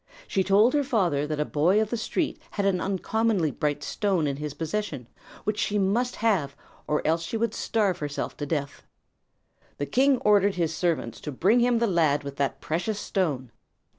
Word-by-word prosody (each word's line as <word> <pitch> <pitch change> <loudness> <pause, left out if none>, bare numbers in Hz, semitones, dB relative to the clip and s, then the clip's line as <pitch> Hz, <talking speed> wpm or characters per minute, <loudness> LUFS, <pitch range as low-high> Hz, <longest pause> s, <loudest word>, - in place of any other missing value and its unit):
She 190 - +1
told 205 +6 +4
her 290 -1 +2
father 175 - +1
that 155 -1 -3
a 150 - +1
boy 170 +9 +2
of 220 -1 -1
the - - +1
street 290 +8 -2
had 200 - -2
an 185 -2 +1
uncommonly 195 -3 0
bright 145 -1 -2
stone 190 -1 0
in 140 -2 -1
his 150 -1 -5
possession 160 - -3 0.4
which 210 0 -1
she 210 - 0
must 225 +6 +1
have 180 -12 0 0.3
or 150 - 0
else 165 +2 +2
she 170 +7 -3
would 225 -1 0
starve 205 -5 0
herself 145 -1 -4
to 145 - -4
death. 145 -2 -3 1.0
The 145 - -2
king 265 - +3
ordered 205 -1 +4
his 165 -3 -1
servants 170 0 -1
to 150 - -5
bring 195 - +3
to 240 - +4
him 245 -1 +3
the 235 - +2
lad 160 -8 +2
with 140 0 -7
that 135 -1 -1
precious 195 +7 -2
stone. 145 - -2
185 Hz, 195 wpm, -26 LUFS, 150-215 Hz, 1.0 s, told